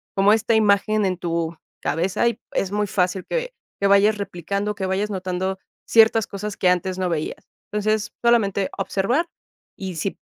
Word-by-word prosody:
como 195 +1 +5
esta 225 +1 +2
imagen 210 0 +3
en 185 -1 0
tu 170 -1 -2 0.3
cabeza 180 +8 0
y 235 0 -6
es 195 0 -1
muy 210 0 0
fácil 185 -1 0
que - - -2 0.3
que 200 - +4
vayas 200 +2 +5
replicando, 200 +2 -3
que 195 -2 -3
vayas 195 +3 -1
notando 190 0 -2 0.3
ciertas 225 -1 +5
cosas 200 +1 -5
que 180 - +3
antes 180 +1 0
no 185 -1 0
veías. 155 -2 -3 0.2
Entonces, 210 0 0
solamente 200 -5 +3
observar 205 - 0 0.5
y 190 -3 -5
sí 190 +5 -3
200 Hz, 165 wpm, -22 LUFS, 185-210 Hz, 0.5 s, como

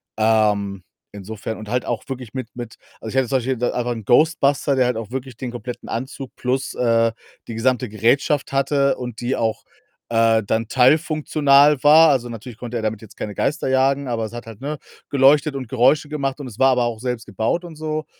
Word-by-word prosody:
Ähm, 105 -3 +1 0.3
insofern 105 +2 -6
und 110 - -9
halt 125 +3 -1
auch 120 - -2
wirklich 130 -3 -7
mit 125 -3 -5
mit 120 -2 -8 0.2
also, 110 - -7
ich 135 - -4
hatte 130 -2 +2
zum 135 - +2
Beispiel 130 +1 -2
da 120 - 0
einfach 120 0 -2
'n 110 -3 -8
Ghostbuster, 140 0 +3
der 130 -1 +3
halt 125 -1 0
auch 115 -3 -6
wirklich 130 -2 -6
den 125 - -5
kompletten 120 0 -7
Anzug 130 +2 -6
plus, 130 +1 -2
äh, 115 -2 +2 0.3
die 115 - -6
gesamte 125 +1 0
Gerätschaft 135 +8 +1
hatte 140 0 +2
und 125 -3 -7
die 125 +2 -1
auch, 110 -1 -2 0.5
äh, 115 -1 +3
dann 110 +2 -1
teilfunktional 145 +1 +3
war. 155 +2 +7
Also, 125 -4 +1
natürlich 115 0 -9
konnte 120 -1 -5
er 110 - -4
damit 110 0 -2
jetzt 110 - -15
keine 105 - -5
Geister 150 +4 -1
jagen, 135 +1 +2
aber 115 -2 -2
es 110 - -9
hat 120 - -7
halt, 115 +1 -11
ne, 150 +2 -4 0.3
geleuchtet 140 +1 +4
und 130 -3 -5
Geräusche 140 +5 +2
gemacht 140 -2 -3
und 140 - -6
es 115 -3 -10
war 135 - +5
aber 125 -2 +2
auch 115 -2 -3
selbst 125 -2 -4
gebaut 110 - -2
und 165 - -10
so. 155 0 -4
125 Hz, 210 wpm, -21 LUFS, 115-140 Hz, 0.5 s, war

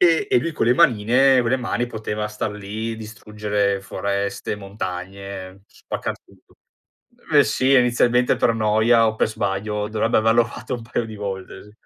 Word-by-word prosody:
E 170 -3 +4
e - - +5
lui 165 +6 -3
con 135 - -1
le 120 - +4
manine 125 +4 +4
vo 120 - -1
le 130 - +2
mani 120 -1 -2
poteva 105 -2 -4
star 105 0 -3
lì, 110 +2 -5
distruggere 105 -2 -2
foreste, 100 +1 -3
montagne, 95 -1 -7
spaccar - - -6
tutto. - - -25 0.8
Beh, - - +6
sì, 130 +1 +1
inizialmente 125 -1 +3
per 115 - +2
noia 110 +1 +3
o 110 - -1
per - - +1
sbaglio 105 0 -2
dovrebbe 110 +1 +1
averlo 115 +2 +4
fatto 120 +3 -7
un 120 - -9
paio 115 +1 -3
di 110 -1 -9
volte, 95 -2 -6
sì. 105 - -17
110 Hz, 165 wpm, -22 LUFS, 100-120 Hz, 0.8 s, Beh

